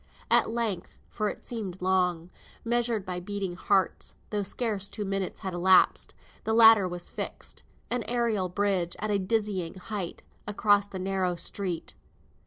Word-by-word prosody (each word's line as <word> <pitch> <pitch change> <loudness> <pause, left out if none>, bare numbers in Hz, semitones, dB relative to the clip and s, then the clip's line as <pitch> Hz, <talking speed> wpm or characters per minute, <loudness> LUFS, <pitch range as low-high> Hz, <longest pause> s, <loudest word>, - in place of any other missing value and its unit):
At - - +5
length 225 -6 -3
for 215 -2 -1
it - - -9
seemed 200 -6 -5
long, 180 -2 +1 0.3
measured 235 -3 0
by 180 -1 -3
beating 195 0 -4
hearts, 190 0 0 0.2
though 210 -1 0
scarce 205 0 -2
two 210 - -4
minutes 195 -1 -3
had 190 -1 -4
elapsed 185 +1 +4 0.3
the 220 - 0
ladder 225 -4 +8
was 175 -1 -5
fixed, - - -5 0.3
an 245 0 0
aerial 230 -6 0
bridge 185 -2 0
at 215 +1 -2
a 200 - +2
dizzy 195 -4 -1
height, 190 -1 -5 0.2
across 205 -1 +3
the 195 - -7
narrow 185 -1 0
street. 180 -1 -3
195 Hz, 150 wpm, -28 LUFS, 185-215 Hz, 0.3 s, ladder